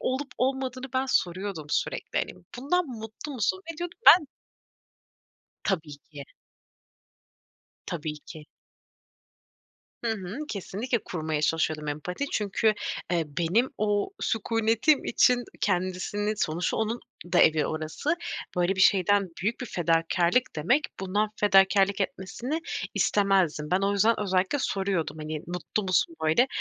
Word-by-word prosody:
olup 265 +2 -2
olmadığını 260 0 -1
ben 260 +1 +1
soruyordum 185 - -1
sürekli. - - -1
Hani, - - -2 0.3
bundan 335 +6 +1
mutlu 225 +4 -7
musun 265 - 0
ve - - -16
diyordu 350 0 -4
ki, - - -50
ben 335 -4 +9 1.4
Tabii 160 -7 -2 0.2
ki. 140 -1 -8 1.6
Tabii 155 -3 -4
ki. 155 -1 -10 1.6
Hı 230 - 0
hı. 200 +3 -6
Kesinlikle 220 +5 -2
kurmaya 155 -4 -2
çalışıyordum 155 -1 0
empati 180 - -3
çünkü, 215 +1 +1 0.4
eee, 170 -2 +1
benim 195 +10 +2
o 205 - +1
sükûnetim 225 +5 +2
için 245 0 +3 0.2
kendisini, 195 +3 -1
sonuçta 170 -1 -1
onun 225 +2 -1 0.3
da 175 - +4
evi 155 -1 +5
orası, 155 - -2 0.4
böyle 180 +2 +1
bir 190 - -1
şeyden 195 +1 +4
büyük 215 +5 -1
bir 250 - -4
fedakârlık 170 +5 +1
demek 245 - +2
bundan 205 +3 0
fedakârlık 195 0 +4
etmesini 235 - -3 0.3
istemezdim. 190 -7 +2
Ben 185 +2 +3
o 200 +1 +1
yüzden 215 +3 +3
özellikle 190 +6 +1
soruyordum 190 -8 -1
hani 155 0 -4
mutlu 180 +4 -3
musun 195 - +1
böyle 160 +11 +4
200 Hz, 125 wpm, -27 LUFS, 175-235 Hz, 1.6 s, ben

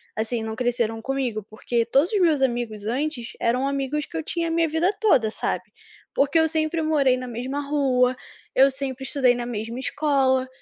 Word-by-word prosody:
assim, 225 +1 -2
não 220 0 -4
cresceram 235 -2 -1
comigo 250 -5 -2
porque 230 +2 -1
todos 275 - +2
os 405 - +3
meus 310 -5 +3
amigos 235 -5 -1
antes 250 0 -2
eram 250 +4 +1
amigos 275 +1 -1
que - - -13
eu 320 - -2
tinha 335 +1 -2
a - - -2
minha 330 -1 +2
vida 340 +6 +1
toda 270 - +4
sabe? - - -3 0.5
Porque 285 +4 +3
eu 320 - +4
sempre 315 +1 0
morei 280 -5 +3
na 255 - -6
mesma 250 +4 -4
rua, 255 -3 +2 0.4
eu 270 +1 +6
sempre 265 -1 -3
estudei 260 -3 +2
na 240 0 -4
mesma 230 0 -4
escola, 265 -2 +1
265 Hz, 185 wpm, -24 LUFS, 240-300 Hz, 0.5 s, eu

